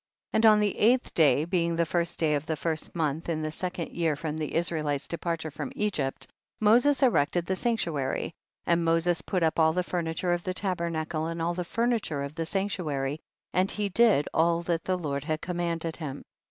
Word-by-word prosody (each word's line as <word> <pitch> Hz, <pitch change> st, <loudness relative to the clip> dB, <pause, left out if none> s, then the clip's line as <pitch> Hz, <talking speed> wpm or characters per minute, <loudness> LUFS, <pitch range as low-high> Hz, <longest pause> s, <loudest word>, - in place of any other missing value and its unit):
4. -, -, +1 dB
And 220 Hz, -, +4 dB
on 215 Hz, -1 st, +7 dB
the 210 Hz, -2 st, 0 dB
eighth 245 Hz, +4 st, +3 dB
day, 155 Hz, -1 st, +4 dB
being 170 Hz, -1 st, 0 dB
the 170 Hz, 0 st, +2 dB
first 170 Hz, +1 st, -1 dB
day 155 Hz, -2 st, +2 dB
of 145 Hz, +1 st, -1 dB
the 160 Hz, -, 0 dB
first 160 Hz, +3 st, -3 dB
month, 160 Hz, 0 st, -1 dB
in 155 Hz, -2 st, -1 dB
the 155 Hz, -, -2 dB
second 180 Hz, +1 st, -4 dB
year 165 Hz, -3 st, 0 dB
from 150 Hz, +1 st, -4 dB
the 155 Hz, -2 st, -4 dB
Israelites' 155 Hz, -4 st, 0 dB
de -, -, -3 dB
parture 160 Hz, -3 st, -3 dB
from 260 Hz, -, -5 dB
Egypt, 155 Hz, -, -1 dB, 0.3 s
Moses 245 Hz, +7 st, +4 dB
erected 175 Hz, -, +3 dB
the 190 Hz, -, -1 dB
sanctuary, 170 Hz, -, -1 dB, 0.3 s
and 170 Hz, 0 st, +2 dB
Moses 165 Hz, 0 st, +2 dB
put 180 Hz, 0 st, -1 dB
up 160 Hz, +1 st, +1 dB
all 160 Hz, 0 st, +5 dB
the 180 Hz, +1 st, 0 dB
furniture 175 Hz, 0 st, -1 dB
of 175 Hz, -, -1 dB
the 185 Hz, +1 st, -3 dB
tabernacle 170 Hz, -4 st, -2 dB
and 165 Hz, 0 st, -4 dB
all 170 Hz, +1 st, 0 dB
the 180 Hz, +1 st, -3 dB
furniture 225 Hz, -8 st, -1 dB
of 140 Hz, +1 st, -6 dB
the 165 Hz, 0 st, -3 dB
sanctuary, 160 Hz, -8 st, -2 dB, 0.3 s
and 185 Hz, +2 st, +2 dB
he 205 Hz, -1 st, -1 dB
did 200 Hz, -7 st, +4 dB
all 170 Hz, +1 st, +2 dB
that 170 Hz, -1 st, -1 dB
the 185 Hz, -1 st, +1 dB
Lord 140 Hz, -5 st, -3 dB
had 155 Hz, -1 st, -1 dB
com 175 Hz, +1 st, -4 dB
manded 165 Hz, -1 st, -2 dB
him. 145 Hz, -4 st, -6 dB
170 Hz, 205 wpm, -28 LUFS, 155-185 Hz, 0.3 s, on